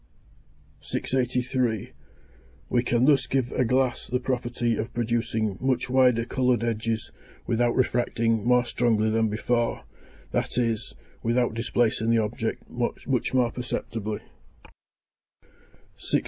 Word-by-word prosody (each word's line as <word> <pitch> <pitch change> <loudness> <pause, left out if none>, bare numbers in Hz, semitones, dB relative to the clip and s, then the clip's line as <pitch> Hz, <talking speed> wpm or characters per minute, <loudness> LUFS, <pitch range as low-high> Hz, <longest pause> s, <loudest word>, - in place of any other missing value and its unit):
683. 125 -3 -1 0.8
We 120 - +3
can 120 0 +2
thus 135 -4 +4
give 130 -2 0
a - - +1
glass 130 +1 +1
the 125 - 0
property 120 -2 -1
of 115 +2 -4
producing 115 -3 0
much 130 -1 0
wider 125 -3 +4
coloured 125 -2 +1
edges 115 -1 -2 0.3
without 120 0 +1
refracting 115 -3 +1
more 125 +1 +4
strongly 110 -3 +1
than 110 0 +2
before, 115 +2 0 0.5
that - - -1
is, 115 -3 -1 0.3
without 120 0 +1
displacing 115 -1 +1
the 115 - +4
object 110 +1 -2
much 120 -1 -3 0.3
more 120 -2 +3
perceptibly. 110 -3 -4 1.8
684. - - +1
120 Hz, 115 wpm, -26 LUFS, 115-125 Hz, 1.8 s, thus